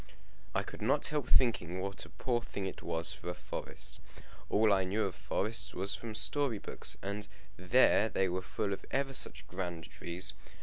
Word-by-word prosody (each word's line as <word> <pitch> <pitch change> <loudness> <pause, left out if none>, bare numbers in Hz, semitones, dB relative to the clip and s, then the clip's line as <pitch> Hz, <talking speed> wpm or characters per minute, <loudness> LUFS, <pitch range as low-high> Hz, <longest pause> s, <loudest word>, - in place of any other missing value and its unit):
I - - +2
could - - -9
not - - +3
help 150 -4 -1
thinking 95 -8 +3
what 100 +1 -3
a - - -12
poor 120 -3 0
thing 100 -4 -4
it 95 - -5
was 80 0 0
for 80 - -6
a 90 - -2
forest. - - -6 0.5
All 105 0 +5
I 95 -1 +3
knew 100 +4 +1
of 95 - -1
forests 115 +6 -1
was 95 +2 +1
from 115 -2 -5
story 140 -2 +2
books, - - 0
and 100 +1 -3 0.3
there 110 +3 +5
they 95 -1 +2
were 90 +1 -1
full 100 +2 -1
of - - -6
ever 135 0 0
such - - 0
grand 90 -3 -4
trees. 85 +2 -2
100 Hz, 185 wpm, -34 LUFS, 90-115 Hz, 0.5 s, All